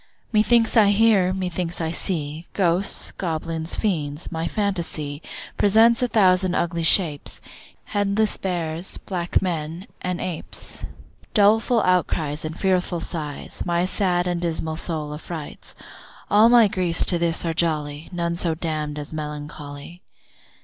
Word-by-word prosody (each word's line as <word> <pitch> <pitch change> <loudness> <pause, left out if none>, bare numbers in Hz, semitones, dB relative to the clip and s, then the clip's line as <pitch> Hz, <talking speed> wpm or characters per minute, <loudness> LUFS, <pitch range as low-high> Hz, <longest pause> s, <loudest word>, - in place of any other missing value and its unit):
Methinks 225 +2 +3
I 215 -3 +6
hear, 205 -3 +4
methinks 180 -2 -3
I 160 -1 -1
see 160 -2 -3
Ghosts, 185 0 +2
goblins, 165 -1 -3
fiends; 155 -7 -2
my 165 0 -2
phantasy 170 -8 -2 0.4
Presents 225 +4 +5
a 250 - +2
thousand 185 -4 +3
ugly 170 0 -1
shapes, 160 -3 +4 0.4
Headless 205 +1 0
bears, 170 -2 -2
black 180 -1 -1
men, 165 0 -3 0.2
and 180 -1 -2
apes, 175 -4 -6 0.5
Doleful 220 +3 +4
outcries, 160 -4 0
and 160 +1 -6
fearful 185 -2 +1
sights, 155 -4 -5
My 175 0 0
sad 180 -2 0
and 175 -1 -1
dismal 160 -2 -2
soul 155 -3 -3
affrights. 155 0 -8 0.6
All 215 +3 +6
my 235 -2 +7
griefs 180 -5 +1
to 175 - +2
this 170 0 0
are 165 - 0
jolly, 155 -2 -1
None 170 -1 -2
so 170 -1 0
damn'd 155 -2 -3
as 150 +1 -6
melancholy. 150 +1 -7
175 Hz, 130 wpm, -23 LUFS, 160-190 Hz, 0.6 s, my